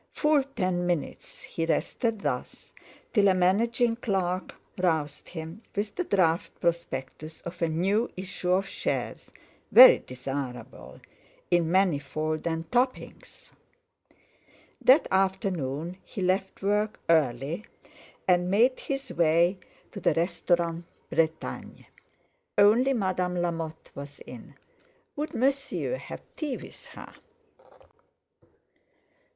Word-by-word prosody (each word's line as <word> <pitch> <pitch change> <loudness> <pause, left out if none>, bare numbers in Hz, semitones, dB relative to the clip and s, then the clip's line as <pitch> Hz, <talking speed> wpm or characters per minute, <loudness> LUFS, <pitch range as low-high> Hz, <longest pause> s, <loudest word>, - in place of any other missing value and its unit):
Full 300 -1 +3
ten 185 -4 0
minutes 175 -5 -4
he 165 - -4
rested 220 +6 -1
thus, - - -4 0.4
till 205 -3 +5
a 190 - +4
managing 230 +6 +2
clerk 190 -5 -2 0.2
roused 160 -5 -1
him 165 +4 -7
with 205 +1 -2
the 360 - -2
draft 180 - +1
prospectus 160 -2 -3
of 170 +1 -8
a 165 - +3
new 195 +8 +1
issue 185 -1 -3
of 190 +2 +2
shares, - - -3 0.4
very - - +10
desirable, 130 -1 -7 0.5
in 175 -2 +3
Manifold 155 -4 0
and 165 0 -3
Topping's. 255 +1 -2 1.3
That 270 +5 +6
afternoon 185 -4 -1
he 195 - -6
left 190 +1 -1
work 210 +2 0
early 155 - +1 0.6
and 180 -1 +3
made 235 +7 +3
his 275 0 -4
way 170 +3 +3 0.3
to 200 - -7
the 170 - +2
Restaurant 170 0 0 0.3
Bretagne. 160 -1 -2 0.7
Only 225 +7 +5
Madame 185 -5 -1
Lamotte 165 -2 -3
was 140 0 -9
in. - - -11 0.6
Would 300 +1 -4
Monsieur 275 - 0
have - - -9
tea 295 -5 -3
with - - -12
her? - - -12
180 Hz, 110 wpm, -27 LUFS, 165-205 Hz, 1.3 s, very